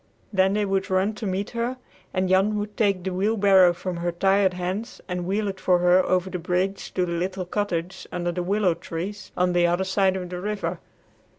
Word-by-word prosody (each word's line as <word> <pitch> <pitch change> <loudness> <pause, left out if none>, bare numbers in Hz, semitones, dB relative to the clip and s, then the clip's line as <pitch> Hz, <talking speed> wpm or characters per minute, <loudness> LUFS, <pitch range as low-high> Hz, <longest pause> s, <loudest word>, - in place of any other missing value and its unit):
Then 190 0 +3
they 210 0 +1
would 195 0 -1
run 190 +3 +1
to 210 0 -5
meet 190 +2 -2
her, 240 +2 -2 0.3
and 185 0 0
Jan 195 +3 +3
would 210 0 -4
take 200 -4 +1
the 190 0 -2
wheelbarrow 195 -2 +4
from 175 +1 -5
her 175 +1 -1
tired 190 +1 +2
hands 185 +7 -4
and 180 -1 -3
wheel 205 +2 0
it 195 -1 -4
for 180 -1 +3
her 180 +1 +4
over 185 0 +1
the 185 -1 -4
bridge 180 +3 -1
to 180 - +2
the 175 - -4
little 185 +2 -2
cottage 180 -2 -3
under 175 -1 -2
the 180 +1 -3
willow 190 0 +2
trees 175 +4 -6
on 180 0 +2
the 175 0 +4
other 175 +2 +1
side 190 0 +2
of 180 -1 -5
the 180 0 -4
river. 210 +1 -3
190 Hz, 210 wpm, -24 LUFS, 180-200 Hz, 0.3 s, wheelbarrow